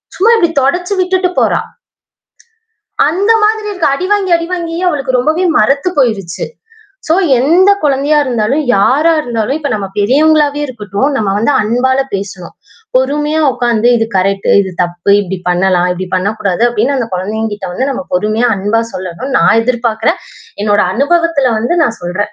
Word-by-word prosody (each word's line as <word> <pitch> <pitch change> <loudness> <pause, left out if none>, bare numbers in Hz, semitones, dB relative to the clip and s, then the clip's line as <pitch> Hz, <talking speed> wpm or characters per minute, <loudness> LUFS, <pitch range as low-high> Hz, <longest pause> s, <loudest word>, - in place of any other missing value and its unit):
சும்மா 440 +5 +3
இப்படி 340 -5 +2
தொடச்சு 355 +8 0
விட்டுட்டு 370 0 0
போறா. - - +1 1.5
அந்த 390 +8 0
மாதிரி 430 0 0
இருக்கு. 370 -5 -1
அடிவாங்கி, 380 +4 -1
அடிவாங்கியே 335 0 -4
அவளுக்கு 270 -5 -1
ரொம்பவே 315 +8 0
மறத்து 275 +10 +2
போயிருச்சு. 205 -10 -1 0.6
சோ 320 - +3 0.3
எந்த 350 +8 +4
குழந்தையா 290 +1 +1
இருந்தாலும், 250 +4 0
யாரா 290 +11 +3
இருந்தாலும், 240 +1 -2
இப்போ 285 -3 -3
நம்ம 200 -2 -3
பெரியவங்களாவே 290 +5 +2
இருக்கட்டும். 215 0 -3
நம்ம 200 -4 0
வந்து 230 +7 +1
அன்பால 250 +4 0 0.2
பேசணும். 195 -3 -6 0.4
பொறுமையா 295 +4 0
உட்கார்ந்து, 240 -1 0
இது 225 -1 0
கரெக்ட் 195 +1 0
இது 190 -1 -3
தப்பு, 175 +3 -2
இப்பிடி 190 -1 -5
பண்ணலாம், 180 0 +1
இப்பிடி 185 +1 -6
பண்ணக்கூடாது 195 +1 -1
அப்பிடின்னு 240 +4 0
அந்த 230 - -3
குழந்தைங்கக்கிட்ட 205 +1 -4
வந்து 260 +9 -2
நாம 275 +1 -4
பொறுமையா 215 +6 +1
அன்பா 205 +4 0
சொல்லணும்னு 185 +9 -4
நான் - - +4
எதிர்பார்க்கிறேன். 235 +4 -1 0.4
என்னுடைய 205 -1 +2
அனுபவத்தில 285 0 +1
வந்து 240 +11 -1
நான் 230 -5 -1
சொல்றேன். 205 +4 -3
250 Hz, 140 wpm, -13 LUFS, 205-310 Hz, 1.5 s, எந்த